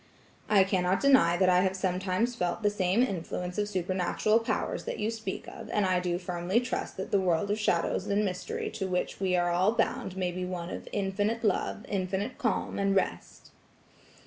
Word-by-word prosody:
"I 200 -2 +6
cannot 190 -1 +1
deny 265 -12 +5
that 185 0 +3
I 180 0 +5
have 190 0 +1
sometimes 185 +5 0
felt 180 -2 -2
the 205 - +3
same 195 +3 +2
influence 180 -3 -3
of 205 0 0
supernatural 185 +3 +1
powers 230 - -2
that - - -3
you 215 +2 -1
speak 220 -4 -5
of, - - -9
and 210 -2 +1
I 185 -1 +2
do 175 -1 -1
firmly 180 +3 0
trust 245 - -4
that 190 - -5
the 200 - +4
world 185 +2 +1
of 210 - 0
shadows 175 -5 0
and 205 +1 +1
mystery 180 -2 -3
to 215 -3 -3
which 180 -1 -2
we 185 -2 +1
are 175 0 +2
all 185 +5 +3
bound 190 -4 -1
may 180 -1 0
be 180 +1 -4
one 180 -1 -4
of - - -7
infinite 205 +3 -1
love, 210 +2 0
infinite 195 +4 -2
calm 225 -4 -1
and 195 0 +2
rest." 190 - -2
190 Hz, 195 wpm, -29 LUFS, 180-210 Hz, -, I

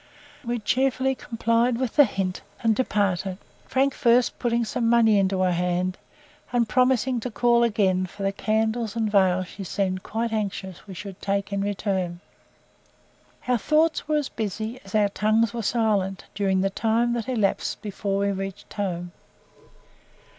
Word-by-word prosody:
We 240 0 -2
cheerfully 260 +3 +1
complied 230 0 0
with 255 -2 -2
the 290 - +8
hint 190 -4 -3 0.2
and 225 -1 +3
departed, 195 -5 0 0.3
Frank 270 +1 +2
first 240 0 +2
putting 235 -1 +1
some 230 +1 0
money 225 -3 +5
into 190 -1 +1
her 185 -1 +3
hand, 180 +1 -1 0.5
and 240 -2 +2
promising 255 +1 +2
to 250 - -4
call 235 +1 +3
again 190 -5 +2
for 195 +3 -8
the 195 - +1
candles 220 +2 -1
and 220 -2 0
veils 185 -2 +3
she 200 - -8
seemed 185 +1 -1
quite 225 +3 -3
anxious 195 -3 -4
we 190 - -8
should 195 +1 -8
take 200 0 -1
in 200 - 0
return. 190 -3 -2 1.3
Our 250 -2 +2
thoughts 310 +7 +2
were 305 0 +2
as 295 -2 -1
busy 220 +3 -4
as 195 +2 -8
our 210 -1 +4
tongues 215 +2 +1
were 235 - -3
silent, 205 -4 0
during 195 -2 +1
the 195 0 0
time 230 +3 +1
that 240 +1 -3
elapsed 215 -6 0
before 200 -1 -2
we 200 0 +1
reached 195 0 -6
home. 175 -4 -3
215 Hz, 160 wpm, -25 LUFS, 195-235 Hz, 1.3 s, the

